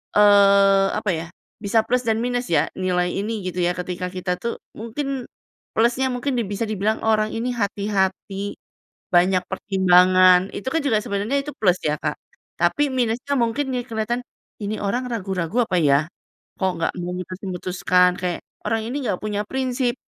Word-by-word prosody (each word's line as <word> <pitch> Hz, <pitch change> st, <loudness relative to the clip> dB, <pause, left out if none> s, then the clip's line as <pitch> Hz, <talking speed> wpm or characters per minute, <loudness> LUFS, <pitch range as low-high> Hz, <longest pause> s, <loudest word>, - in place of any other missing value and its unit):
eee, 200 Hz, -1 st, +6 dB
apa 210 Hz, -2 st, 0 dB
ya, 160 Hz, 0 st, -3 dB, 0.3 s
bisa 220 Hz, +2 st, +2 dB
plus 250 Hz, +1 st, 0 dB
dan 225 Hz, +1 st, +1 dB
minus 245 Hz, 0 st, -1 dB
ya, 155 Hz, -1 st, +3 dB
nilai 180 Hz, -1 st, 0 dB
ini 210 Hz, 0 st, -3 dB
gitu 180 Hz, 0 st, -4 dB
ya, 175 Hz, 0 st, +1 dB
ketika 180 Hz, 0 st, -4 dB
kita 180 Hz, -1 st, -2 dB
tuh 235 Hz, -, -4 dB, 0.2 s
mungkin 255 Hz, +3 st, -4 dB, 0.5 s
plusnya 240 Hz, +4 st, +2 dB
mungkin 250 Hz, +1 st, -2 dB
di 235 Hz, -, +1 dB
bisa 200 Hz, +3 st, -3 dB
dibilang 215 Hz, +1 st, 0 dB
"Orang 215 Hz, -1 st, +2 dB
ini 235 Hz, +2 st, -2 dB
hati-hati, 200 Hz, -1 st, -1 dB, 0.6 s
banyak 180 Hz, +2 st, +4 dB
pertimbangan." 185 Hz, -1 st, +5 dB
Itu 205 Hz, -, -7 dB
kan 325 Hz, -, +3 dB
juga 245 Hz, -7 st, +2 dB
sebenarnya 205 Hz, +7 st, -1 dB
itu 295 Hz, -, -5 dB
plus 185 Hz, -3 st, +2 dB
ya 150 Hz, -, +2 dB
Kak? -, -, -2 dB, 0.4 s
Tapi 290 Hz, 0 st, +2 dB
minusnya 255 Hz, +2 st, -1 dB
mungkin 255 Hz, +4 st, 0 dB
nih 250 Hz, -2 st, -2 dB
kelihatan, 225 Hz, +1 st, -2 dB, 0.4 s
"Ini 210 Hz, 0 st, -4 dB
orang 240 Hz, +6 st, -1 dB
ragu-ragu 195 Hz, 0 st, -1 dB
apa 185 Hz, -, 0 dB
ya? 150 Hz, -1 st, +3 dB, 0.5 s
Kok 190 Hz, -1 st, +2 dB
nggak -, -, 0 dB
memutus-memutuskan?" 180 Hz, 0 st, 0 dB
Kayak, 180 Hz, -1 st, -2 dB, 0.2 s
"Orang 220 Hz, 0 st, 0 dB
ini 270 Hz, +1 st, -3 dB
nggak 185 Hz, -, 0 dB
punya 210 Hz, -1 st, -2 dB
prinsip!" 255 Hz, -1 st, -1 dB
205 Hz, 160 wpm, -22 LUFS, 185-235 Hz, 0.6 s, eee